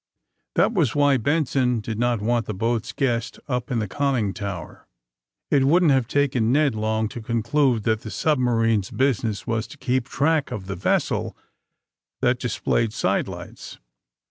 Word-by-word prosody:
That -, -, +3 dB
was 160 Hz, -, +1 dB
why 145 Hz, -2 st, +4 dB
Benson 130 Hz, -2 st, +1 dB
did 110 Hz, 0 st, -5 dB
not 120 Hz, -2 st, +1 dB
want 115 Hz, -1 st, 0 dB
the 110 Hz, -, -3 dB
boat's 115 Hz, +2 st, -1 dB
guest 115 Hz, -2 st, -1 dB
np 125 Hz, -2 st, -2 dB
in 125 Hz, -, -1 dB
the 110 Hz, -2 st, -1 dB
conning 125 Hz, -5 st, 0 dB
tower. 100 Hz, -6 st, -7 dB, 0.6 s
It 135 Hz, -2 st, +4 dB
wouldn't 165 Hz, +2 st, +4 dB
have 130 Hz, -4 st, +2 dB
taken 130 Hz, -4 st, +1 dB
Ned 145 Hz, -1 st, +3 dB
long 110 Hz, 0 st, 0 dB
to 120 Hz, -, -7 dB
conclnde 120 Hz, +1 st, +1 dB
that 110 Hz, 0 st, +1 dB
the 110 Hz, -, -7 dB
submarine 115 Hz, -6 st, +2 dB
's 95 Hz, -, -9 dB
business 115 Hz, -6 st, 0 dB
was 115 Hz, 0 st, -1 dB
to -, -, -13 dB
keep 130 Hz, -1 st, -1 dB
track 155 Hz, +1 st, +1 dB
of 100 Hz, -3 st, -5 dB
the 100 Hz, +1 st, -4 dB
vessel 90 Hz, -, -1 dB, 0.8 s
that 125 Hz, -1 st, +1 dB
displayed 115 Hz, -2 st, 0 dB
sidelights. -, -, -3 dB
120 Hz, 160 wpm, -23 LUFS, 110-135 Hz, 0.8 s, why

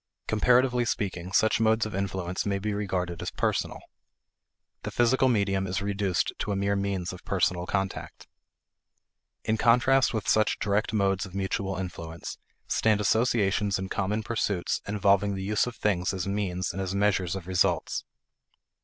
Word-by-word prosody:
Comparatively 125 Hz, +3 st, +3 dB
speaking, 95 Hz, -6 st, -3 dB
such 110 Hz, +4 st, +3 dB
modes 110 Hz, 0 st, +3 dB
of 110 Hz, -, -6 dB
influence 95 Hz, -2 st, -2 dB
may 100 Hz, -1 st, 0 dB
be 105 Hz, +2 st, -2 dB
regarded 90 Hz, -4 st, -2 dB
as -, -, -2 dB
personal. -, -, -1 dB, 1.0 s
The -, -, -4 dB
physical 130 Hz, +2 st, +3 dB
medium 100 Hz, -4 st, +1 dB
is 90 Hz, +1 st, -1 dB
reduced 100 Hz, -2 st, 0 dB
to 105 Hz, -, -2 dB
a -, -, 0 dB
mere 100 Hz, +1 st, +1 dB
means 100 Hz, -2 st, -2 dB
of 90 Hz, -, -11 dB
personal 90 Hz, -1 st, 0 dB
contact. 95 Hz, -1 st, -3 dB, 1.2 s
In 110 Hz, -, 0 dB
contrast 125 Hz, +3 st, +4 dB
with 110 Hz, -3 st, -3 dB
such 110 Hz, 0 st, +3 dB
direct 105 Hz, +1 st, 0 dB
modes 100 Hz, -2 st, +1 dB
of 95 Hz, -, -13 dB
mutual 95 Hz, 0 st, -2 dB
influence, 85 Hz, -3 st, -6 dB, 0.3 s
stand 110 Hz, -2 st, +2 dB
associations 105 Hz, -2 st, +2 dB
in 95 Hz, 0 st, -5 dB
common 105 Hz, +3 st, -1 dB
pursuits 100 Hz, -5 st, -1 dB
involving 100 Hz, -1 st, +2 dB
the 95 Hz, -, -4 dB
use 105 Hz, +4 st, +1 dB
of 120 Hz, -, -5 dB
things 95 Hz, -3 st, 0 dB
as 95 Hz, 0 st, -3 dB
means 100 Hz, -2 st, -2 dB
and 95 Hz, -, -3 dB
as 95 Hz, 0 st, -3 dB
measures 100 Hz, -3 st, +1 dB
of 95 Hz, -3 st, -6 dB
results. 90 Hz, -2 st, +1 dB
100 Hz, 155 wpm, -27 LUFS, 95-105 Hz, 1.2 s, contrast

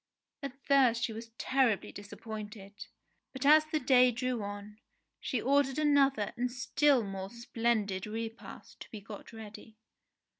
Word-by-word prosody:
At 275 Hz, -1 st, -7 dB
first 255 Hz, -4 st, +4 dB
she 225 Hz, -, -1 dB
was 225 Hz, +1 st, -8 dB
terribly 260 Hz, -6 st, +1 dB
disappointed, 205 Hz, 0 st, -9 dB, 0.5 s
but 265 Hz, 0 st, -5 dB
as 305 Hz, +2 st, +7 dB
the 310 Hz, 0 st, -1 dB
day 255 Hz, -1 st, +5 dB
drew 250 Hz, 0 st, -2 dB
on, 205 Hz, +1 st, -7 dB, 0.4 s
she 255 Hz, -, -2 dB
ordered 275 Hz, +2 st, +2 dB
another 275 Hz, -8 st, +2 dB
and 245 Hz, 0 st, -1 dB
still 260 Hz, +1 st, +2 dB
more 195 Hz, -1 st, -5 dB
splendid 225 Hz, -4 st, -1 dB
repast 225 Hz, +1 st, -7 dB
to -, -, -10 dB
be 215 Hz, -, -8 dB
got 205 Hz, 0 st, -11 dB
ready. 220 Hz, 0 st, -11 dB
235 Hz, 140 wpm, -31 LUFS, 210-265 Hz, 0.5 s, as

